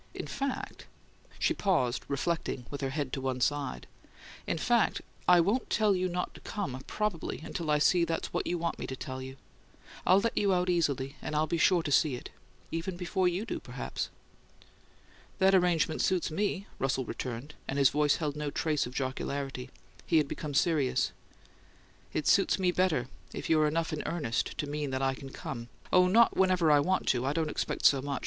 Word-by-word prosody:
"In - - -4
fact 275 -1 -4 0.3
" - - -26
She - - +2
paused, 130 -11 +1
reflecting, 140 -3 -2
with 140 - -5
her 135 - -1
head 140 -1 -3
to 135 - -2
one 130 -1 -2
side. 140 - -1 0.6
"In - - 0
fact, 235 +7 +2 0.3
I 180 -1 +7
won't 205 +9 +1
tell 210 -3 +3
you 185 0 0
not 180 0 -3
to - - -12
come, 185 - -4
probably, 210 -6 -2
until 165 -2 -4
I 150 - +4
see 170 +4 +4
that's 165 -1 -2
what - - -1
you 175 - 0
want 170 0 -2
me - - -4
to 130 - -4
tell 130 0 -6
you. 130 +1 -8 0.7
I'll 185 +2 +5
let 230 +3 -1
you 200 -2 +3
out 180 0 +1
easily 140 -5 0
and 150 - -4
I'll 155 +1 +3
be 165 +1 -1
sure 175 0 +4
to 145 - -3
see 145 -1 +3
it. 120 - -9 0.4
Even 175 +2 -3
before 180 +1 0
you 180 +5 -1
do, - - -3
perhaps." - - -5 1.3
"That 195 0 +4
arrangement 175 -4 +3
suits 180 -3 +1
me," 200 +3 -1
Russell 135 -1 0
returned, 130 +5 -5
and 135 - -2
his 140 -2 +5
voice 150 0 +3
held 150 -3 -2
no 150 -1 -2
trace 150 -2 0
of 125 - -10
jocularity: 130 -1 -3 0.4
he 165 - +4
had 150 -2 +3
become 145 0 -5
serious. 150 -5 +2 1.0
"It 155 - -2
suits 195 - +4
me 185 -2 +2
better 175 -9 +1 0.3
if - - -3
you're 155 -1 +5
enough 160 +1 -1
in 155 - -2
earnest 150 -10 -2
to - - -1
mean 145 0 -3
that 130 0 -2
I 135 0 +2
can 135 +1 -9
come 120 -2 -7 0.2
oh, 180 0 +6
not 225 +5 +5
whenever 185 -4 +3
I 145 - +6
want 185 +6 +1
to; 125 -1 +2
I 135 +2 0
don't 160 -1 -1
expect - - -2
so 135 -2 +6
much! 140 -1 -3
155 Hz, 200 wpm, -30 LUFS, 135-180 Hz, 1.3 s, I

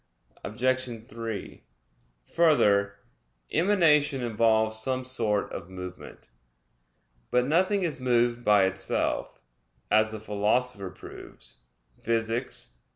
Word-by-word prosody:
Obj. 120 0 -2
3: 115 -4 -6 0.7
Further, 100 -12 +3 0.6
emanation 150 -7 +3
involves 110 -1 +2
some 130 +2 -2
sort 110 -5 -1
of 90 -1 -7
movement. 90 -6 -10 1.0
But 125 0 +2
nothing 185 +7 +2
is 165 -6 -1
moved 120 -1 +1
by 105 -3 +5
itself, 95 0 -1 0.5
as 110 +1 +4
the 110 - -6
Philosopher 105 0 0
proves - - -11 0.4
(Phys. 115 - -1
115 Hz, 95 wpm, -27 LUFS, 105-130 Hz, 1.0 s, by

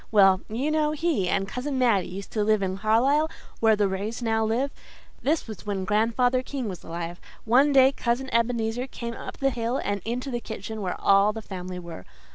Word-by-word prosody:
Well, 195 -3 +6
you 255 +8 -1
know 305 -1 +1
he 305 - 0
and 195 0 0
Cousin 260 +6 -3
Mattie 230 -8 +3
used 195 +2 -8
to 215 - 0
live 215 -1 +2
in 190 0 -2
Carlisle, 265 +9 +3 0.3
where 220 -1 +5
the 205 -1 +2
Rays 200 +4 -3
now 225 -1 +1
live. 240 +6 0 0.5
This 305 +3 +1
was 220 -3 -8
when 195 -2 -2
Grandfather 235 +5 +2
King 260 -2 -4
was 185 -4 -6
alive. 170 +1 -6 0.2
One 260 +6 +5
day 265 -1 +6
Cousin 255 0 -1
Ebenezer 235 +1 0
came 235 -2 -6
up - - -8
the 270 0 +1
hill 240 +1 -1
and 200 -1 -2
into 250 +4 -3
the 240 -1 -2
kitchen 220 0 -6
where 185 -2 -3
all 200 +1 +4
the 225 - -6
family 185 -2 -6
were. 170 - -8
225 Hz, 200 wpm, -26 LUFS, 200-255 Hz, 0.5 s, Well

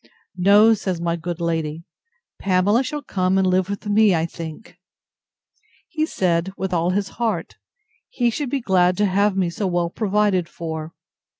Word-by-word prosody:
—No, 205 +5 +6
says 190 -5 -3
my 170 0 -1
good 170 +1 -5
lady, 165 -1 -2 0.6
Pamela 195 +5 +2
shall 295 +2 -4
come 185 -4 0
and 190 - +3
live 185 0 +1
with 200 +1 -5
me, 210 -2 +4
I 160 0 0
think. 165 +7 -9 1.1
He 315 -1 -1
said, 175 - 0
with 190 -1 -3
all 170 0 +1
his 195 +1 -1
heart; 225 -2 -2 0.5
he 240 -2 0
should 280 +3 -3
be 280 0 -1
glad 180 -4 +2
to 210 - +2
have 200 +1 +1
me 180 -3 +1
so 195 +3 -2
well 175 -1 -1
provided 205 -4 +1
for. 160 -1 -6
185 Hz, 165 wpm, -21 LUFS, 170-210 Hz, 1.1 s, No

